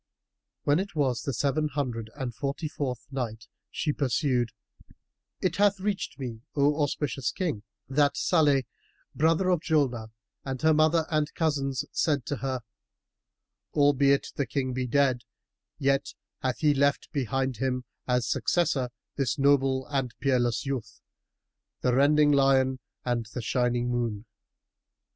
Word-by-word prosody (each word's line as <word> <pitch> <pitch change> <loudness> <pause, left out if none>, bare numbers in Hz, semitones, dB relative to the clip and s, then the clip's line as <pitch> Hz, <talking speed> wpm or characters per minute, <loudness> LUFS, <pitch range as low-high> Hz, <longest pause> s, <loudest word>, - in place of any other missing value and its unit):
When 145 +3 +3
it 190 -3 -4
was 130 -5 +1
the 140 - -2
Seven 140 +4 0
Hundred 125 -6 -3
and 130 -4 -4
Forty 140 +5 -3
fourth 135 -5 -4
Night, 115 -5 -4 0.2
She 150 - -1
pursued, 130 -3 +1 0.9
It 185 - 0
hath 200 -1 +3
reached 200 0 -2
me, 120 -5 -6
O 145 +1 +3
auspicious 140 -2 -1
King, 165 - -2 0.3
that 140 +2 +2
Salih 145 -6 +3 0.5
brother 165 +4 +2
of 180 -2 +3
Julnar 135 -9 0 0.3
and 130 -1 -4
her 160 0 +5
mother 155 +1 +3
and 155 -1 +1
cousins 140 -4 0
said 145 -6 +1
to 145 - -2
her, 130 -1 -2 1.1
"Albeit 140 -1 +4
the 140 - -1
King 130 +2 -1
be 130 0 -2
dead, 130 -1 +2 0.6
yet 140 -1 0 0.2
hath 130 -1 -2
he 150 -2 +4
left 140 0 +1
behind 135 -3 -1
him 125 +1 -1 0.2
as 125 -1 +1
successor 145 -7 +1 0.3
this 135 -1 0
noble 135 -2 +3
and 135 -4 -2
peerless 125 -4 +1
youth, 115 -5 -4 0.8
the 125 - +2
rending 145 +3 +5
lion 135 -2 +3 0.3
and 120 -3 -1
the 125 - -2
shining 120 0 0
moon." 115 -3 -2
135 Hz, 135 wpm, -28 LUFS, 125-150 Hz, 1.1 s, her